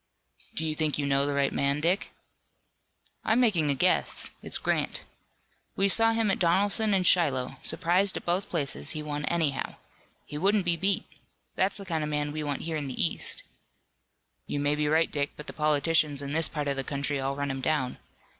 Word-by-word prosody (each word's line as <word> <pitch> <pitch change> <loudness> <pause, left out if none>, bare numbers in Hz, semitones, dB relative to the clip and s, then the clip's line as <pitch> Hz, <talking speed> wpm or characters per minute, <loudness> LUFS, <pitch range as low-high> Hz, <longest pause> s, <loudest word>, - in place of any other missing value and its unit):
"Do 160 - -1
you 155 - 0
think 155 -1 0
you 145 - -1
know 140 0 +2
the 145 - -1
right 140 -1 +1
man, 140 +1 +1
Dick?" 175 +6 0 1.1
"I'm 220 +3 +2
making 185 -12 +3
a 140 - +2
guess. 180 +7 +1
It's - - -1
Grant. - - -1 0.7
We 195 - +2
saw 225 +3 +4
him 225 -2 +1
at - - -1
Donelson 200 +4 +2
and 185 -1 +1
Shiloh. 135 -8 +2
Surprised 185 +3 +2
at - - -8
both 180 +3 0
places, 140 - 0
he 150 - -3
won 150 0 -3
anyhow. 160 -6 0 0.5
He 150 - -6
wouldn't 200 +2 +2
be 175 -1 +2
beat. 190 +3 0 0.5
That's 190 +2 +1
the 200 - -6
kind 165 -4 -2
of 150 - -3
man 150 0 -1
we 155 +1 -4
want 145 -2 -3
here 160 -1 -2
in 145 -2 -4
the 130 - -7
east." 85 - 0 1.0
"You 145 - -2
may 145 +1 +2
be 150 0 0
right, 160 +2 +2
Dick, 145 -1 -1
but 150 - -8
the - - -8
politicians 150 -1 +2
in 140 - -5
this 165 +2 +3
part 150 -2 -3
of 140 -1 -1
the 135 - -1
country 140 +1 -2
all 135 +1 -2
run 140 0 -2
him 135 0 -4
down. 130 -2 -1
150 Hz, 200 wpm, -28 LUFS, 140-180 Hz, 1.1 s, saw